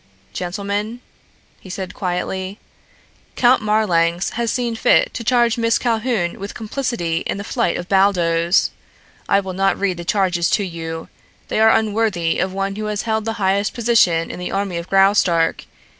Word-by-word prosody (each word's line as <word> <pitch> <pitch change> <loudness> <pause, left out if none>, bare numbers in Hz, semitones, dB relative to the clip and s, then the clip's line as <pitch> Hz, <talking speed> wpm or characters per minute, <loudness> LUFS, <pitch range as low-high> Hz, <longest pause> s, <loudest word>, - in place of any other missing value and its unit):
"Gentlemen," 200 +5 -3 0.6
he 190 - -13
said 185 0 -5
quietly, 185 +1 -3 0.8
"Count 245 0 +4
Marlanx 180 -5 +1
has 235 0 -1
seen 240 -2 -1
fit - - +3
to 235 - -5
charge 235 -1 +2
Miss 230 0 +2
Calhoun 225 -6 -1
with 200 +1 -7
complicity 220 -7 -2
in - - -2
the 200 - -5
flight 230 -4 -1
of 175 - -6
Baldos. 175 -3 +2 0.6
I 200 - +4
will 190 -1 -6
not 195 +1 +1
read 195 -3 0
the 175 - -6
charges 175 -2 +1
to 205 - -2
you. 165 -2 -6 0.4
They - - 0
are 220 0 +6
unworthy 215 -6 +1
of 190 - 0
one 195 +1 -3
who 215 - -3
has 210 -1 -2
held 220 -1 -1
the 225 - -1
highest 200 +1 0
position 215 -9 +2
in - - -8
the 180 - -4
army 195 -3 -2
of 170 +1 -6
Graustark. 195 -4 +3
195 Hz, 165 wpm, -20 LUFS, 175-220 Hz, 0.8 s, are